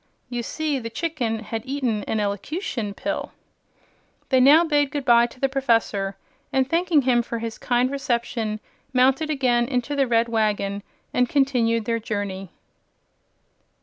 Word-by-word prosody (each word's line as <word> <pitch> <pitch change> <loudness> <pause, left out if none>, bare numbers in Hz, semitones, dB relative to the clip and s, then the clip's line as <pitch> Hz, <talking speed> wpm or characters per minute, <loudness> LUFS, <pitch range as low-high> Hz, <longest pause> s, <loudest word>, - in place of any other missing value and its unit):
You 240 -1 -2
see, 300 +3 -2
the 230 -2 -5
chicken 240 -4 -2
had 225 +1 -4
eaten 255 -6 -1
an 220 - -1
Elocution 210 - -3
Pill." 300 +6 -4 1.0
They 260 - +4
now 290 +6 +7
bade 290 -3 +2
good 280 -1 -4
bye 235 0 +6
to 255 - -17
the 270 - +2
Professor, 225 -7 0 0.3
and 265 -1 +2
thanking 330 -1 +2
him 245 -2 +3
for 235 0 -4
his 230 -1 -5
kind 250 +1 +1
reception 235 -5 -2 0.3
mounted 265 +5 +3
again 250 -5 +2
into 250 +2 -1
the 275 -2 +2
red 230 0 +2
wagon 210 -3 0 0.3
and 250 -1 +2
continued 240 -5 +2
their 230 0 0
journey. 200 -3 -4
245 Hz, 150 wpm, -23 LUFS, 225-275 Hz, 1.0 s, now